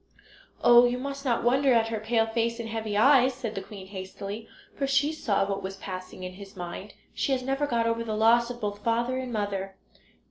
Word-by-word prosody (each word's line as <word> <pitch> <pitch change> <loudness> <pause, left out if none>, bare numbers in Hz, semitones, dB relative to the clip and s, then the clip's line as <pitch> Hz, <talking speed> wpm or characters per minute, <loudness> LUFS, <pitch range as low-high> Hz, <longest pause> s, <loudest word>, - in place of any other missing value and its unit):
"Oh, 240 0 +8
you 245 0 +1
must 275 +2 -5
not 240 -4 0
wonder 265 +2 +4
at 225 -1 +2
her 225 -1 -2
pale 225 +1 +1
face 230 +1 -1
and 230 - -4
heavy 220 -2 -3
eyes," 260 +2 +5
said 240 -4 -5
the 195 - -4
queen 190 -1 -10
hastily, 195 +3 -7 0.3
for 275 - -1
she 285 +3 +2
saw 205 -10 0
what 195 -1 -2
was 190 +1 -5
passing 185 -1 -7
in 180 0 -6
his 200 +2 -12
mind. 180 +3 -7 0.2
"She 275 - 0
has 255 -1 -1
never 270 +2 0
got 235 -3 +1
over 230 0 0
the 220 -2 -3
loss 235 +2 +4
of 240 -1 -6
both 205 -1 -4
father 235 +2 +1
and 255 -1 -5
mother." 200 -3 -3
230 Hz, 215 wpm, -27 LUFS, 200-250 Hz, 0.3 s, Oh